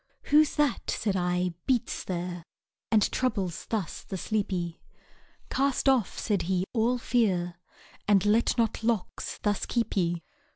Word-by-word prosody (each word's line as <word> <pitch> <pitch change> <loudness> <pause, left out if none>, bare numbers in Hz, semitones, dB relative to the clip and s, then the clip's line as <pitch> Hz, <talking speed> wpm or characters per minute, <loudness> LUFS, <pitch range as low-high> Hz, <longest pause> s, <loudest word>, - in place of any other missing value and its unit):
Who's 305 0 +6
that, 295 -4 +1
said 205 -3 0
I, 180 -1 0
beats 250 -4 0
there, 175 -1 -4 0.5
And 215 -2 +5
troubles 195 -9 -1
thus 210 -7 -2
the 190 - -5
sleepy? 185 -5 -2 0.7
Cast 275 0 +1
off, 260 -7 +3
said 205 -4 0
he, 185 -1 +2
all 240 +1 +2
fear, 185 -8 0 0.5
And 200 -1 +4
let 220 +4 +3
not 225 -1 0
locks 225 -4 -1
thus 205 -1 0
keep 235 -2 -1
ye. 175 -3 0
205 Hz, 135 wpm, -28 LUFS, 180-235 Hz, 0.7 s, Who's